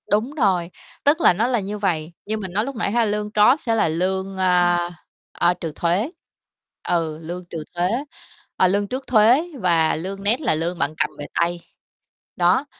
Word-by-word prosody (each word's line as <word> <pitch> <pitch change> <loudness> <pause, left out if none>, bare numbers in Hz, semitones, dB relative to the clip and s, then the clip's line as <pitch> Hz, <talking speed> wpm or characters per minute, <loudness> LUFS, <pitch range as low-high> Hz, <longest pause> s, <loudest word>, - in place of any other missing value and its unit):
Đúng 215 +6 +1
rồi. 185 - +1 0.3
Tức 295 +4 +3
là - - +6
nó 220 +7 +1
là 250 -2 +1
như 205 +1 -4
vầy, 170 -5 -1
như 220 +1 -2
mình 190 -4 -6
nói 210 +3 +1
lúc 275 0 -5
nãy 220 -3 -1
ha, 235 +1 +2
lương 210 0 -2
gross 230 +8 +4
sẽ 230 -2 +2
là 220 - +2
lương, 190 +4 -2
a, 180 -2 +3 0.5
a, 175 - +2
trừ 170 -2 -6
thuế. 185 - 0 0.7
Ừ, 165 -3 -1
lương 175 +2 -6
trừ 160 -2 -5
thuế, 175 +1 +1 0.7
ờ, 185 - +4
lương 200 +2 0
trước 260 +5 -5
thuế 240 +5 +5 0.2
và 170 -5 +2
lương 195 +4 -5
net 225 +8 +2
là 210 - +1
lương 170 +3 -2
bạn 140 +2 0
cầm - - +1
về 145 - -6
tay. 175 +1 0 0.8
Đó, 180 +10 +3
190 Hz, 190 wpm, -22 LUFS, 175-215 Hz, 0.8 s, là